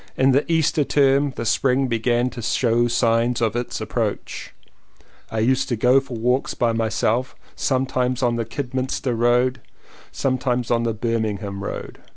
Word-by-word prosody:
In 135 +1 +4
the 140 +5 +1
Easter 160 -2 +2
term 140 0 +3
the 115 - -4
spring 125 +6 +2
began 120 +1 0
to 120 - -7
show 120 +1 +2
signs 120 0 +1
of 115 -1 0
its 120 0 -3
approach. - - -3 0.8
I 110 - -5
used 130 +4 +1
to 120 - +1
go 125 +4 +4
for 130 -3 -7
walks 125 +4 0
by 120 -1 +1
myself 115 +2 0 0.2
sometimes 130 -1 0
on 120 -1 +2
the 115 - -1
Kidderminster 130 0 -3
road, 120 +2 +2 0.5
sometimes 125 -2 -1
on 115 -1 +2
the 115 -2 -1
Birmingham 105 -3 -2
road. - - -6
125 Hz, 155 wpm, -22 LUFS, 115-130 Hz, 0.8 s, In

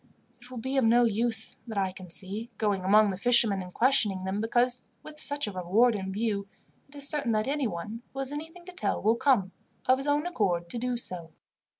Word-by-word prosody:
It 245 - -13
will 255 - -9
be 260 +4 -3
of 265 - +3
no 235 +2 +4
use, 225 0 +1
that 220 -3 -6
I 190 -1 0
can 185 -1 -12
see, 200 +7 -1
going 205 -4 0
among 210 +2 +4
the 190 - -6
fishermen 230 -4 +4
and 180 0 -9
questioning 215 -5 +2
them, 190 +2 -2
because, 245 +2 +3 0.2
with 305 0 -11
such 285 -1 0
a 210 - -4
reward 195 +7 +2
in 190 -2 -4
view, 205 -1 -2 0.4
it 285 - -18
is 285 -1 +2
certain 280 -7 0
that 215 0 0
anyone 230 - -3
who - - -14
has 270 0 -2
anything 325 +4 -8
to 365 - -10
tell 365 - -2
will 220 +2 +2
come, 235 -7 +2 0.3
of 255 +1 +3
his 275 - -4
own 290 +2 +1
accord, 185 - -1
to 240 - -4
do 250 0 -2
so." 175 -8 -4
230 Hz, 220 wpm, -28 LUFS, 195-260 Hz, 0.4 s, no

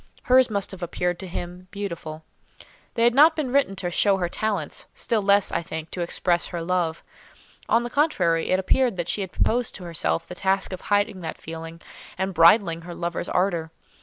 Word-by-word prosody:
Hers 255 0 +5
must 200 -2 -2
have 190 -1 -9
appeared 175 0 -2
to 190 - -7
him 180 +1 -7
beautiful. 170 -6 -6 0.7
They 230 - +1
had 240 0 +5
not 310 +5 +6
been 290 -5 -2
written 270 -8 +2
to 180 -2 -3
show 195 +2 +3
her 180 -2 -1
talents; 215 +3 -2
still 225 -2 0
less, 200 0 +3
I - - 0
think, 160 -1 -7
to 180 - -4
express 175 0 0
her 170 -2 -5
love. 170 -2 -1 0.7
On 230 +1 +3
the 240 - -4
contrary, 180 - +1
it 185 - +3
appeared 230 +3 +1
that 175 -1 -2
she 205 - -1
had 190 -2 -5
proposed 240 +1 0
to 185 - -8
herself 170 -1 -2
the - - -7
task 190 +1 0
of 185 - -6
hiding 205 -2 0
that 160 -2 -5
feeling, 165 +1 -8 0.4
and 190 +1 -2
bridling 170 0 +5
her 175 +1 -8
lover's 170 0 -3
ardour. 175 -3 0
185 Hz, 195 wpm, -24 LUFS, 170-205 Hz, 0.7 s, not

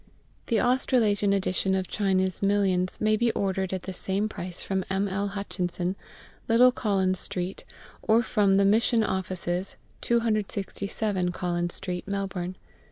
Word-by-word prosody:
The 225 - +2
Australasian 230 -5 +3
edition 190 0 +1
of 190 -1 -1
China's 190 -3 +1
Millions 195 -2 +1
may 215 0 +3
be 235 +2 +2
ordered 190 -1 -1
at 185 -2 -3
the 190 - -5
same 195 +3 -1
price 180 -4 -6
from 190 -1 -1
M. 195 +1 0
L. 200 +1 -2
Hutchinson, 185 -2 -3 0.5
Little 245 +2 +6
Collins 190 -6 0
Street, 180 +1 -2 0.4
or 225 +2 +3
from 205 -3 +2
the 200 - +4
Mission 225 +3 +3
Offices, 185 -1 -2 0.2
267 205 -4 -1
Collins 175 -1 -2
Street, 180 -1 -5
Melbourne. 190 -2 -3
195 Hz, 135 wpm, -27 LUFS, 185-210 Hz, 0.5 s, Little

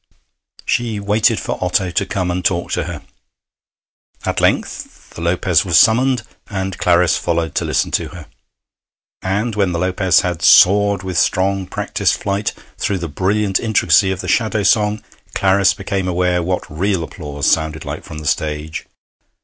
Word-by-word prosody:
She 115 -3 -1
waited 105 +2 +2
for - - -4
Otto 90 0 0
to 100 - 0
come 95 -3 -2
and 90 +1 -3
talk 85 -1 0
to - - -1
her. - - -7 1.2
At - - -1
length - - -2
the - - -9
Lopez 85 0 +2
was 85 -4 +2
summoned, 120 - +4 0.3
and 95 -2 -3
Clarice 85 -2 +3
followed 85 -1 -1
to - - -1
listen - - 0
to - - -1
her. 90 -4 -11 1.0
And 105 +5 -1
when 100 -4 0
the - - -1
Lopez 90 +1 +2
had 90 -3 -3
soared 100 +3 +5
with 95 -1 -1
strong 95 0 +1
practised - - -1
flight 100 +1 -2 0.2
through 100 - -1
the 85 -2 -4
brilliant 95 +5 0
intricacy 110 -3 +3
of 95 -1 -3
the 90 - -7
Shadow 110 +1 +1
Song, 105 +1 +2 0.3
Clarice 95 0 +3
became 95 -1 -3
aware 90 0 +1
what 90 +2 -2
real 90 +3 -1
applause 75 -4 -6
sounded 80 -1 0
like - - -6
from 80 - -9
the 75 - -8
stage. 75 0 -2
95 Hz, 160 wpm, -18 LUFS, 85-100 Hz, 1.2 s, soared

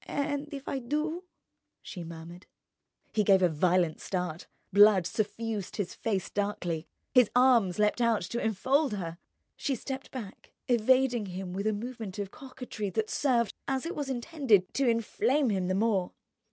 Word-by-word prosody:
"And 285 +1 -2
if 280 -1 -7
I 270 - -2
do—?" 305 +7 -2 0.6
she 175 - -7
murmured. 170 +2 -10 0.7
He 215 - +2
gave 195 -2 +5
a - - +6
violent 170 +1 +1
start, 180 -3 -3 0.3
blood 205 -2 +7
suffused 215 0 -3
his 200 -4 -3
face 200 -5 -2
darkly, 180 -5 -2 0.3
his 250 -4 +6
arms 245 -8 +4
leapt 210 +3 +2
out 230 -2 +3
to 235 +7 -3
enfold 260 +6 +1
her. 170 -4 -5 0.4
She 275 - -1
stepped 265 +3 -6
back, 220 -7 -9
evading 245 -1 +3
him 185 0 -6
with 200 +3 -2
a - - +3
movement 220 -2 -6
of 200 -1 -4
coquetry 250 -6 -6
that 215 +3 -2
served, 240 -6 +1
as 265 +1 -1
it 335 - -4
was 285 -2 -3
intended, 245 - +1
to 275 -2 +1
inflame 240 +3 +1
him 190 -2 0
the 185 - 0
more. 195 -3 +1
215 Hz, 160 wpm, -29 LUFS, 185-260 Hz, 0.7 s, blood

